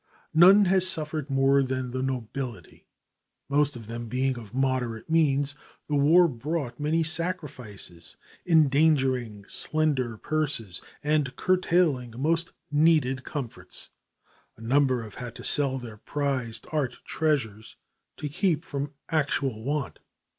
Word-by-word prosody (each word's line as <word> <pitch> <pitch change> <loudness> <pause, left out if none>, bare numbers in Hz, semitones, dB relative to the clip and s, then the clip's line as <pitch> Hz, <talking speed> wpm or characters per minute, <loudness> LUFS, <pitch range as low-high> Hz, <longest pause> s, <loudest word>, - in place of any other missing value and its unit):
None 190 +5 +7
has 185 0 +5
suffered 155 -4 +2
more 135 0 +3
than 130 -1 -2
the 130 +1 -3
nobility. 125 - -5 0.6
Most 145 0 +1
of 115 -2 -9
them 115 +1 -6
being 130 +3 0
of 110 -4 -10
moderate 130 0 -2
means, 145 -3 +3 0.3
the 150 - -4
war 160 +5 +5
brought 135 -1 -4
many 155 +3 +1
sacrifices, 145 - -4 0.3
endangering 135 - +2
slender 140 -7 0
purses 140 - -2 0.2
and 150 -3 0
curtailing 170 -10 +1
most 165 +5 0 0.2
needed 150 -4 +3
comforts. 130 -5 -5 0.7
A - - -15
number 130 0 +2
have 105 -3 -10
had 120 -1 -7
to - - -10
sell 140 -2 +4
their 120 -4 -9
prized 130 -2 -3
art 140 -6 -1
treasures 115 -9 -2 0.4
to 150 - -4
keep 160 +1 0
from 140 +1 -5 0.2
actual 140 -7 -1
want. 140 -3 -3
140 Hz, 125 wpm, -26 LUFS, 125-155 Hz, 0.7 s, None